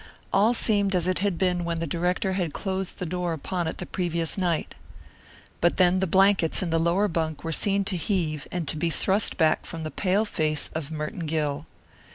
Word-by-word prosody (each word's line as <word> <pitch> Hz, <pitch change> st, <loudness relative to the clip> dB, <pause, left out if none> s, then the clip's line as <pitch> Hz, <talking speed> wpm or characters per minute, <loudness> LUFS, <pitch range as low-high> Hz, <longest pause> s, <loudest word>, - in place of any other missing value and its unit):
All 215 Hz, +5 st, +4 dB
seemed 200 Hz, -4 st, +2 dB
as 175 Hz, -2 st, +1 dB
it 185 Hz, 0 st, +1 dB
had 195 Hz, -3 st, 0 dB
been 180 Hz, -1 st, +1 dB
when 170 Hz, -1 st, -2 dB
the 165 Hz, -, -2 dB
director 180 Hz, +4 st, -1 dB
had 175 Hz, -5 st, -2 dB
closed 190 Hz, -2 st, -3 dB
the 180 Hz, -, -3 dB
door 175 Hz, 0 st, -2 dB
upon 175 Hz, +2 st, -3 dB
it 160 Hz, -, -4 dB
the -, -, -5 dB
previous 170 Hz, -2 st, -1 dB
night. 175 Hz, -4 st, -1 dB, 0.9 s
But 175 Hz, -, +2 dB
then 185 Hz, 0 st, +4 dB
the 190 Hz, -, 0 dB
blankets 190 Hz, -1 st, +3 dB
in 170 Hz, -, -2 dB
the 165 Hz, -, +2 dB
lower 175 Hz, +5 st, +2 dB
bunk 160 Hz, -4 st, -2 dB
were 165 Hz, -, -3 dB
seen 200 Hz, +4 st, +2 dB
to 195 Hz, -2 st, -1 dB
heave 160 Hz, -4 st, -1 dB
and 175 Hz, -4 st, -3 dB
to 155 Hz, -, -1 dB
be 165 Hz, +2 st, 0 dB
thrust 195 Hz, +5 st, +1 dB
back 160 Hz, -3 st, +3 dB
from 165 Hz, -1 st, -6 dB
the 155 Hz, -, -4 dB
pale 200 Hz, +3 st, +1 dB
face 155 Hz, -7 st, -1 dB
of 155 Hz, -2 st, -4 dB
Merton 155 Hz, +2 st, -4 dB
Gill. 150 Hz, -1 st, -2 dB
175 Hz, 210 wpm, -26 LUFS, 160-190 Hz, 0.9 s, All